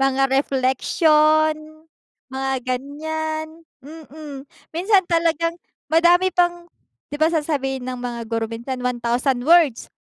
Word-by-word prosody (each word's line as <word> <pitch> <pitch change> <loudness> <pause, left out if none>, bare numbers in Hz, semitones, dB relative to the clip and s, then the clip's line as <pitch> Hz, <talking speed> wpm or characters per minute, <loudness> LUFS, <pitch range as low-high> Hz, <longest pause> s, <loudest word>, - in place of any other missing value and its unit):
mga 270 0 +2
reflection, 305 +4 +2 0.8
mga 270 0 -2
ganyan, 315 +4 -4 0.4
mm. 300 -2 -10 0.3
Minsan 380 +4 +2
talagang 335 0 +1 0.4
madami 350 +3 +4
pang 350 0 0 0.4
'di - - -3
ba, 315 - +4
sasabihin 285 -5 -2
ng 255 -1 -5
mga 240 -1 -5
guro 225 -1 -2
minsan 235 +3 -6
1000 245 +1 -1
words 325 -7 +4
295 Hz, 110 wpm, -21 LUFS, 255-325 Hz, 0.8 s, madami